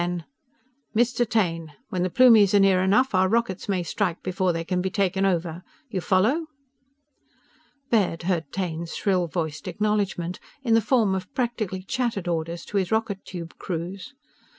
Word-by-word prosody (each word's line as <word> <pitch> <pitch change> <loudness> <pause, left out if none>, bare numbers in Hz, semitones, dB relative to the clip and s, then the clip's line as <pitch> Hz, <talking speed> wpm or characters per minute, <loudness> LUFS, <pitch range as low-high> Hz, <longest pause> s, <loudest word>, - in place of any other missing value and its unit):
Then: 175 -1 -2 0.7
"Mr. 240 0 +2
Taine! 165 -8 0 0.2
When 180 - -2
the 185 - +1
Plumies 220 -3 +6
are - - +6
near 195 -2 +4
enough, 210 +7 +3
our 185 0 +3
rockets 225 -4 -1
may 185 -3 +1
strike 175 +1 -2
before 185 0 0
they 165 -1 -2
can 180 +1 -1
be 190 - -1
taken 195 -1 +1
over! 170 -2 -1 0.3
You 190 -4 -2
follow?" 225 - +2 1.4
Baird 195 -7 +2
heard 170 -5 -1
Taine's 170 -3 -3
shrill 185 -3 +1
voiced 160 -3 -4
acknowledgment 200 -4 -1 0.2
in 230 -4 +2
the 225 - +5
form 220 -3 +2
of 185 -1 -4
practically 220 -7 -2
chattered 230 -4 -2
orders 170 0 -2
to 205 - -3
his 190 -3 0
rocket 220 -3 -1
tube 170 -3 -8
crews. 185 - -5
190 Hz, 160 wpm, -25 LUFS, 175-215 Hz, 1.4 s, Plumies